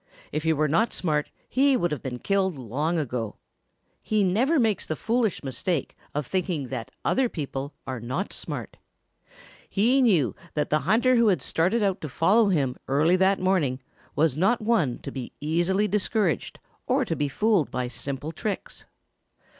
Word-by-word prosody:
If 155 - -1
he 160 +1 +2
were 155 0 +2
not 215 +11 +2
smart 150 -4 0 0.2
he 270 0 +3
would 175 -7 0
have 150 - -3
been 125 -2 -4
killed 190 +4 0
long 140 +8 -1
ago. 125 -7 -3 0.7
He 215 -1 +1
never 245 - +2
makes 220 -4 +1
the 155 - -3
foolish 225 -1 0
mistake 140 +3 -2 0.2
of 150 -1 -1
thinking 170 -5 -2
that 115 - -5 0.2
other 260 -2 +2
people 140 -4 -5
are 130 -2 -4
not 130 - -3
smart. - - -6 0.9
He 240 +7 +3
knew 180 - +3 0.2
that 150 -1 -1
the 155 - +4
hunter 245 +4 +4
who 235 -1 +4
had 185 -6 +3
started 190 +8 +1
out 195 -2 0
to 155 - -5
follow 200 - +3
him 140 -9 +1
early 150 +6 +3
that 190 +1 +3
morning 175 -9 +1 0.4
was 150 -2 +2
not 195 +9 +2
one 210 - +1
to - - -5
be 130 -3 -6
easily 175 +7 +1
discouraged 205 -3 0 0.3
or - - +2
to - - -2
be 145 - 0
fooled 205 0 +2
by 125 -1 -2
simple 140 +4 -5
tricks. 215 - -5
170 Hz, 170 wpm, -26 LUFS, 145-210 Hz, 0.9 s, the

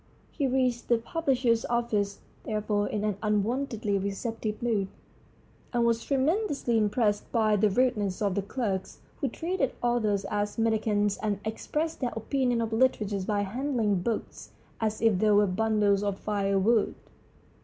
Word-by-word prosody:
He 280 -4 -1
reached 255 -2 0
the 235 - +4
publisher's 250 -3 +1
office, 220 -4 -1 0.2
therefore, 210 -1 -1
in 210 - -2
an 210 -2 0
unwontedly 215 0 0
receptive 215 +2 -3
mood, 220 -5 0 0.9
and 240 -1 +2
was 230 -1 +1
tremendously 285 - 0
impressed 210 -1 +1
by 215 -3 +3
the 210 +1 +3
rudeness 210 -4 +1
of 200 -3 +1
the 200 - 0
clerks, 200 -2 -3 0.2
who 275 - -1
treated 325 0 -1
authors 220 -5 +1
as 205 0 -2
mendicants 215 -2 +1
and 210 -2 -2
expressed 300 +9 -2
their 245 -3 -2
opinion 245 +1 0
of 225 -1 -2
literature 215 -5 +1
by 205 +1 0
handling 220 -2 0
books 225 +4 -4 0.3
as 215 0 -1
if 220 -5 +4
they 215 - +3
were 205 0 +5
bundles 205 0 +2
of 200 -1 -1
firewood. 200 +2 +1
220 Hz, 145 wpm, -28 LUFS, 205-240 Hz, 0.9 s, were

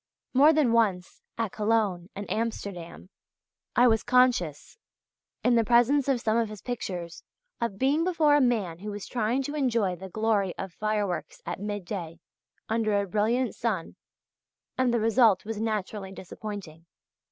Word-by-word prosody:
More 285 +4 +7
than 300 -6 +3
once, 200 -6 +1 0.2
at 225 -4 -1
Cologne 210 -5 0
and 200 +1 -6
Amsterdam, 200 -5 -4 0.6
I 245 - +6
was 225 -2 +3
conscious 245 - +1 0.6
in 245 - +4
the 230 -1 +4
presence 245 +5 +3
of 270 -3 +2
some 225 -1 +1
of 230 -2 +1
his 215 -2 -10
pictures 180 -8 -5 0.4
of 230 -5 -2
being 280 +7 +2
before 325 -5 +3
a 290 - +4
man 210 -10 0
who 210 +3 -6
was 205 -1 -6
trying 240 +3 0
to 290 - -4
enjoy 230 -10 +1
the 190 +2 -9
glory 210 -2 0
of 190 -2 -6
fireworks 210 -3 -2
at 175 - -4
midday, 190 -5 -5 0.5
under 215 -2 +1
a 200 - -1
brilliant 225 +6 +1
sun, 215 -8 -3 0.8
and 255 -1 +2
the 235 - +2
result 225 -3 +4
was 220 -1 -4
naturally 210 -3 -3
disappointing. 185 -3 -8
215 Hz, 150 wpm, -27 LUFS, 190-240 Hz, 0.8 s, More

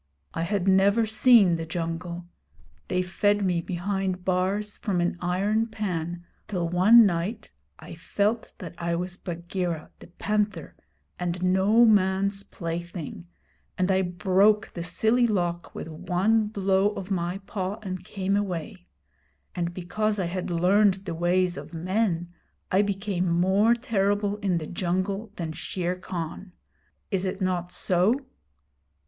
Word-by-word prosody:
I - - -2
had 190 +2 -1
never 200 +4 +4
seen 215 -5 +5
the 165 - -4
jungle. 170 +1 -4 0.6
They 180 0 0
fed 205 +2 +1
me 175 -2 +1
behind 185 +1 -2
bars 190 +3 0
from 195 -5 -1
an 175 +1 0
iron 200 +5 +1
pan 175 -6 -4 0.2
till 180 -5 -1
one 200 +7 +7
night 200 +4 -2 0.3
I - - -10
felt 210 +3 -1
that 180 - -8
I 170 0 -1
was 180 +1 -3
Bagheera 175 -2 -4
the - - -13
Panther 210 +4 -2 0.4
and 180 0 -2
no 190 +6 +4
man's 195 -1 +3
plaything, 170 -2 -6 0.5
and 185 +1 +2
I 190 0 +3
broke 190 +4 +2
the 170 - -5
silly 220 +8 +2
lock 175 -5 -2
with - - -6
one 185 +7 +1
blow 200 0 +1
of 195 -1 -6
my 175 0 -1
paw 190 -1 -3
and 185 -2 -5
came 195 0 -2
away; 175 - -3 0.7
and 170 -1 -2
because 210 +5 -1
I 190 - 0
had 180 +2 -3
learned 185 +4 +4
the 170 - -3
ways 175 +1 +1
of 150 +4 -8
men, 175 -1 -1 0.4
I 190 - +4
became 195 -3 -1
more 190 +7 +3
terrible 205 -3 0
in 195 -4 0
the 160 - -3
jungle 190 +5 -2
than 165 -4 -4
Shere 175 +2 -3
Khan. 180 0 -6 0.6
Is 190 -2 0
it 190 0 -3
not 180 -2 -1
so?' 190 +11 +2
185 Hz, 140 wpm, -26 LUFS, 175-205 Hz, 0.7 s, one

